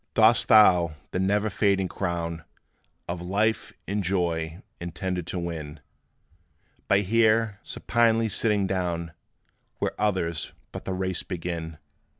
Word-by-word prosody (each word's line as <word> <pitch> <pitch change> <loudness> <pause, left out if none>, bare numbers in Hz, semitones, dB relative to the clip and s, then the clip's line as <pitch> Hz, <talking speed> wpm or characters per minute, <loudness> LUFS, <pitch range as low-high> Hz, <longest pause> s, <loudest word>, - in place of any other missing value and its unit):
Dost 110 +1 +5
thou 90 -8 +6 0.2
the - - -1
never 100 +3 +2
fading 95 -2 +2
crown 85 -3 -3 0.6
Of 85 0 -4
life 105 +5 0 0.2
and 100 +1 -1
joy 85 -1 -1 0.2
intend 90 0 -4
to 90 - -3
win, 80 -3 -5 1.1
By 100 - +4
here 110 0 +2
supinely 115 -1 +1
sitting 105 -1 +1
down, 90 -3 -2 0.7
Where - - -1
others 90 -6 -1 0.2
but - - -8
the 95 - -2
race 95 -1 -2
begin? 85 -2 -5
95 Hz, 120 wpm, -26 LUFS, 85-105 Hz, 1.1 s, thou